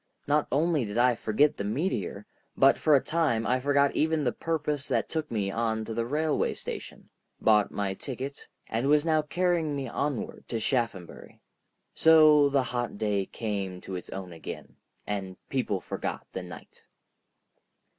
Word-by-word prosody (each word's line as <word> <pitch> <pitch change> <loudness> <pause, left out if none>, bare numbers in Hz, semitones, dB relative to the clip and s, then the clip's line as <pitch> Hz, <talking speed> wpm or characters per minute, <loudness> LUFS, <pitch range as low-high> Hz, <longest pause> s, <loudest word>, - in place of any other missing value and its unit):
Not 145 +1 +2
only 155 +1 +2
did 105 0 -4
I 125 +1 +5
forget 120 +6 +2
the - - -3
meteor, 105 - -2 0.3
but 135 +1 +6
for 155 -2 +5
a 135 - +3
time 155 -9 +1
I 125 +1 +2
forgot 140 +1 +2
even 160 -1 +1
the 125 - +1
purpose 150 -2 -2
that - - 0
took 155 -1 -3
me 100 -4 -1
on 110 0 -1
to 110 - -5
the 115 +1 -1
railway 150 +3 0
station, - - -7 0.3
bought 105 -2 +4
my 100 -2 -2
ticket, 135 +6 -7 0.2
and 115 +4 -1
was 150 +1 +4
now 155 -1 +3
carrying 165 0 0
me 135 -2 -3
onward 135 0 -3
to 115 - -2
Shaphambury. 110 -7 -3 0.5
So 155 -3 +6
the 140 -1 +2
hot 120 -3 -3
day 100 -3 0
came 100 -5 -4
to 95 - -8
its 90 - -6
own 95 -2 -7
again, 80 - -9 0.3
and 95 -3 -4
people 120 -7 -1
forgot - - -5
the - - -4
night. - - -12
125 Hz, 165 wpm, -28 LUFS, 105-150 Hz, 0.5 s, but